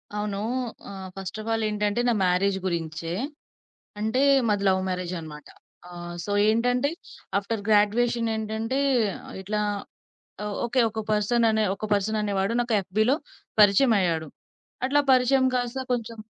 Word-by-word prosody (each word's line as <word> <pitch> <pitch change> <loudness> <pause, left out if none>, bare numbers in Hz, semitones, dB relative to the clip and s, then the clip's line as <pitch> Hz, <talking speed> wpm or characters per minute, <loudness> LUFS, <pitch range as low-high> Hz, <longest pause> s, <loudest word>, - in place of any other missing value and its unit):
అవును. 210 -1 -2 0.5
ఆహ్, 190 -1 -7
first 195 +2 -6
of 215 - -9
all 225 0 0
ఏంటంటే 210 +2 0
నా - - +3
మ్యారేజ్ 190 +2 +2
గురించే 165 -2 -3 0.9
అంటే 220 +4 0 0.3
మాది 205 -1 +1
లవ్ 190 0 +3
మ్యారేజనమాట. 170 -4 -5 0.4
ఆహ్, 175 0 -7
సో 205 - -4 0.2
ఏంటంటే 245 +5 +2 0.5
ఆఫ్టర్ 205 +1 -3
గ్రాడ్యువేషన్ 230 +3 +3
ఏంటంటే 220 +4 -2 0.6
ఇట్లా 210 +2 -2 0.8
ఆహ్, 210 -1 -3
ఓకే. 250 +2 +1
ఒక 220 +1 -4
పర్సననే, 220 +1 +2
ఒక 200 - -7
పర్సననే 210 +1 0
వాడు 195 +4 0
నాకు 240 -1 0
యఫ్‌బీ‌లో 215 +7 +1 0.4
పరిచయమయ్యాడు. 195 -6 +4 0.6
అట్లా 285 +2 +3
పరిచయం 260 +1 +4
కాస్త 245 +1 -2
కొంచుం 230 -2 -3
210 Hz, 125 wpm, -25 LUFS, 190-230 Hz, 0.9 s, పరిచయమయ్యాడు